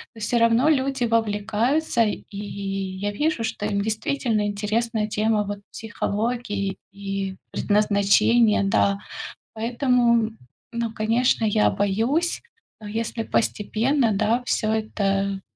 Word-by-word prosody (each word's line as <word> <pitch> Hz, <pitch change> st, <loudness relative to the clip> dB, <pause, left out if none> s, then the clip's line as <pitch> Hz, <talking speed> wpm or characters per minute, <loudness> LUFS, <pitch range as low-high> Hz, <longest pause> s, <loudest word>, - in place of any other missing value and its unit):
То 225 Hz, -, -11 dB
всё 235 Hz, +3 st, 0 dB
равно 230 Hz, +4 st, +4 dB
люди 270 Hz, -3 st, +1 dB
вовлекаются 230 Hz, +5 st, +1 dB
и 210 Hz, -, 0 dB, 0.2 s
я 195 Hz, -1 st, -4 dB
вижу, 295 Hz, +1 st, 0 dB
что 220 Hz, -2 st, -2 dB
им 200 Hz, -1 st, 0 dB
действительно 220 Hz, +1 st, -1 dB
интересна 215 Hz, +2 st, -1 dB
тема, 215 Hz, 0 st, +1 dB
вот, 205 Hz, 0 st, -5 dB
психологии 215 Hz, -2 st, -2 dB
и 195 Hz, -1 st, -4 dB, 0.2 s
предназначения, 210 Hz, +2 st, +3 dB
да. 195 Hz, 0 st, +2 dB, 0.6 s
Поэтому, 235 Hz, -1 st, +2 dB, 0.4 s
ну, 235 Hz, -1 st, -3 dB
конечно, 225 Hz, +2 st, +1 dB
я 210 Hz, 0 st, +3 dB
боюсь, 230 Hz, -, 0 dB, 0.4 s
но 210 Hz, -, -9 dB
если 225 Hz, +1 st, -3 dB
постепенно, 230 Hz, +4 st, +1 dB
да, 220 Hz, +4 st, +1 dB
всё 215 Hz, -3 st, 0 dB
это 200 Hz, -3 st, -1 dB
220 Hz, 110 wpm, -24 LUFS, 205-235 Hz, 0.6 s, равно